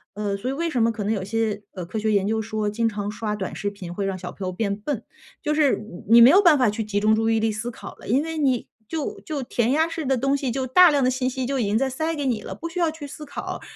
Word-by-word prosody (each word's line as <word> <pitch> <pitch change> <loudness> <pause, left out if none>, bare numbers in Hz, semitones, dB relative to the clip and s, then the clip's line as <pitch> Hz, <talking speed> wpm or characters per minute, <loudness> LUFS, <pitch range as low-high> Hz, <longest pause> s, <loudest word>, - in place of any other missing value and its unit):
呃， 205 -1 -2
所 245 +6 -4
以 - - -1
为 335 +4 -1
什 255 -8 0
么 230 0 +3
可 210 -2 -4
能 215 +2 0
有 195 -3 -2
些， 215 0 -1
呃， 180 -3 -6
科 215 +5 -4
学 215 0 0
研 200 -1 +2
究 220 0 0
说 215 -1 -2
经 230 +1 +1
常 205 -1 -4
刷 210 -1 -3
短 190 -2 -5
视 205 - -2
频 185 -4 -8
会 195 +1 -2
让 190 -1 -2
小 180 -1 -7
朋 190 -2 -6
友 - - -2
变 200 +1 -1
笨。 225 +3 -4 0.4
就 300 -1 +1
是 295 -3 +3
你 210 -4 -10
你 235 +1 +8
没 245 - +9
有 390 +3 +7
办 330 -6 +6
法 245 -5 +3
去 220 +1 -3
集 205 -1 -1
中 215 +1 +3
注 225 0 +1
意 225 - +2
力 220 0 +1
思 215 +3 -4
考 230 - -9
了， - - -13
因 260 +7 +3
为 325 0 -4
你 260 -5 +1 0.2
就 315 -3 -4
就 300 -3 -4
填 240 0 0
鸭 320 +3 +3
式 330 -1 -4
的 265 -1 +2
东 275 +3 +1
西， 275 -3 -2
就 260 +1 -2
大 360 +7 +7
量 285 -3 +2
的 255 - +4
信 255 0 0
息 260 0 -3
就 275 +1 -1
已 - - +1
经 205 +2 +1
在 270 +2 +1
塞 315 +5 -2
给 290 - -3
你 235 -5 0
了， - - -6
不 335 - -6
需 355 +2 -5
要 335 - +3
去 305 -2 -8
思 300 +2 -9
考。 285 - -6
230 Hz, 335 characters per minute, -24 LUFS, 210-280 Hz, 0.4 s, 没